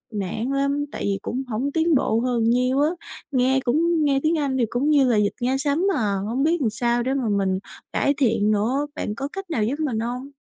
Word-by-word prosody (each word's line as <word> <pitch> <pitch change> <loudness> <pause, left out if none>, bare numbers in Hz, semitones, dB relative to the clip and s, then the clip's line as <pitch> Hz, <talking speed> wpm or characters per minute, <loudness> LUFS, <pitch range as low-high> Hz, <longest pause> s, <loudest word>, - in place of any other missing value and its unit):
nản 215 +4 -3
lắm, 280 +1 0
tại - - -5
vì 195 -1 0
cũng 260 +3 -3
hổng 250 +6 -2
tiến 325 +1 +2
bộ 230 -3 +2
hơn 245 -2 0
nhiêu 250 +3 +2
á, 300 +2 +3 0.4
nghe 260 +1 +2
cũng 320 +5 +2
nghe 275 -1 +2
tiếng 320 +1 +2
Anh 275 -3 -1
thì 235 - +2
cũng 275 +5 0
như 285 -3 +5
là 225 - +3
vịt 205 -1 +2
nghe 255 +2 +1
sấm 290 +4 0
à, 210 -4 0
hổng 255 +4 -1
biết 325 +1 +2
làm 230 -5 +1
sao 240 +1 0
để 265 +2 -1
mà 255 -5 -1
mình 195 -2 +1 0.3
cải 280 - +1
thiện 220 -5 +2
nữa. 235 +8 +1
Bạn 210 - -3
có 275 +5 -4
cách 390 -2 -7
nào 225 -10 0
giúp 275 +8 -2
mình 255 -8 -1
hông? 250 +4 -4
260 Hz, 235 wpm, -23 LUFS, 230-285 Hz, 0.4 s, như